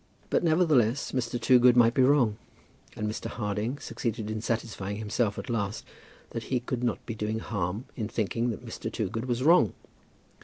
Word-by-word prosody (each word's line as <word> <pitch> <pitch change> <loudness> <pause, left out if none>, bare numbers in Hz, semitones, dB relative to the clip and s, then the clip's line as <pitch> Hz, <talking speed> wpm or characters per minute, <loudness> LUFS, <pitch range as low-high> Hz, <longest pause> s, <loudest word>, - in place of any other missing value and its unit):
But, - - +2
nevertheless, 150 -7 +3
Mr. 120 -2 -2
Toogood 125 0 +5
might 115 -1 +6
be 130 - +3
wrong; 130 -6 +4 0.6
and 105 - -2
Mr. 105 - -4
Harding 105 +4 -2
succeeded 115 -6 -4
in 110 0 -3
satisfying 110 -3 -3
himself 105 0 -1
at - - -6
last 105 -4 -2 0.5
that 115 - -5
he 130 - 0
could 125 0 -4
not 120 - -1
be 115 - -4
doing 110 0 -2
harm 100 0 -3
in 110 -4 -3
thinking 115 +2 -1
that 115 +1 -5
Mr. 115 - -5
Toogood 110 +1 -3
was 125 0 -1
wrong. 160 - +5
115 Hz, 170 wpm, -28 LUFS, 105-125 Hz, 0.6 s, might